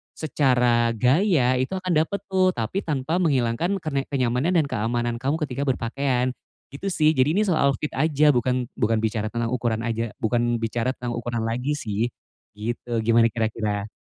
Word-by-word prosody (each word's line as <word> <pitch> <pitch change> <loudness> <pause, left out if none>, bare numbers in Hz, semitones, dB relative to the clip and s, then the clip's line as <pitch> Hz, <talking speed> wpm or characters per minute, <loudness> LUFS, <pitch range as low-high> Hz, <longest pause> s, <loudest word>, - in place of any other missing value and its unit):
secara 125 -6 +2
gaya 130 - +3
itu 130 +8 -2
akan 185 -1 -4
dapet 160 +6 +1
tuh 185 -1 +3
tapi 115 - -2
tanpa 150 +2 -1
menghilangkan 155 +5 +1
kenek 140 -4 -1
kenyamanan 130 +7 +1
dan 145 - -3
keamanan 120 +1 -1
kamu 135 +5 -1
ketika 140 0 -3
berpakaian, 130 +1 0 0.4
gitu 140 +8 -8
sih 155 -1 +4
jadi 135 +4 +3
ini 210 - +3
soal 140 -6 +3
outfit 150 - -4
aja 150 0 +3
bukan 125 -1 0
bukan 110 -1 +2
bicara 110 -1 -1
tentang 115 -1 -1
ukuran 115 -2 -1
aja 115 -1 -2
bukan 120 +1 +1
bicara 115 +3 -1
tentang 120 -1 -4
ukuran 120 -1 -3
lagi 125 +6 -1
sih, 115 -5 -2 0.5
gitu 115 +1 -3
gimana 115 +1 +4
kira-kira? 110 -3 -2
125 Hz, 165 wpm, -24 LUFS, 115-145 Hz, 0.5 s, sih